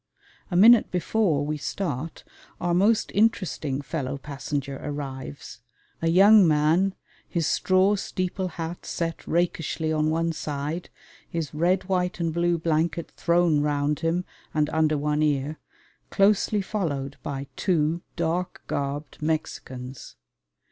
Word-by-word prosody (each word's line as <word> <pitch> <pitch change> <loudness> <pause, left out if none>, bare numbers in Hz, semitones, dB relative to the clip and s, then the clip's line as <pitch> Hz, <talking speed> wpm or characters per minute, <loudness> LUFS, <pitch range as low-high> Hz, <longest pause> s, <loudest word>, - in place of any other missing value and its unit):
A 180 - -3
minute 225 +5 +7
before 180 -4 +1
we 150 +1 -2
start 165 -2 -4 0.4
our 175 0 0
most 210 +5 +3
interesting 185 -10 +1
fellow 140 -2 -3
passenger 140 0 -4
arrives 140 -4 -6 0.4
a 165 - +1
young 195 +3 +7
man 160 +5 +3 0.3
his 170 -3 0
straw 185 +4 +3
steeple 185 -1 -2
hat 165 0 -6
set 165 -1 -4
rakishly 165 -2 0
on 155 0 +1
one 165 +1 +1
side, 150 +2 -4 0.4
his 165 -3 -3
red 175 +5 +2
white 180 -1 -1
and 165 -2 -1
blue 170 0 +2
blanket 165 +1 -1
thrown 170 -3 +2
round 145 0 0
him 170 +2 0 0.3
and 150 0 +1
under 155 -1 +2
one 150 +1 0
ear 150 0 0 0.5
closely 205 +1 +3
followed 145 -10 -3
by 140 -1 -4
two 170 -2 +1
dark 170 +1 -2
garbed 140 +1 -4
Mexicans. 130 -5 -4
160 Hz, 125 wpm, -25 LUFS, 145-180 Hz, 0.5 s, minute